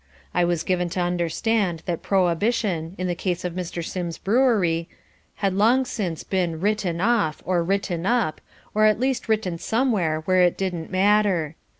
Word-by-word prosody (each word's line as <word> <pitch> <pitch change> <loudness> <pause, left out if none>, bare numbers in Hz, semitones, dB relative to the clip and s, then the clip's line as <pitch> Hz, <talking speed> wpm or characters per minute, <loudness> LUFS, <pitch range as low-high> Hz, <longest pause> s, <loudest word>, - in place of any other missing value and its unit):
I 175 - +3
was 170 -2 0
given 180 -1 0
to - - +1
understand 175 +1 0
that 170 -2 -2
prohibition, 185 -2 0
in 185 - -3
the 180 - 0
case 175 0 -3
of 180 - -2
Mr. 175 -2 -4
Sims's 170 -2 -4
brewery, 200 -8 +2 0.5
had 195 -2 0
long 235 +7 +3
since 185 -10 -3
been 175 -4 -1
"written 195 -3 0
off" 205 -6 +1
or 180 -1 +1
"written 190 -1 -1
up" 235 -10 +1 0.3
or 215 0 +4
at 215 0 +3
least 260 -2 -1
written 190 -6 0
somewhere 205 -10 0
where 185 +3 +2
it 175 -1 +3
didn't 180 -4 -3
matter. 190 -5 +2
185 Hz, 165 wpm, -23 LUFS, 170-210 Hz, 0.5 s, or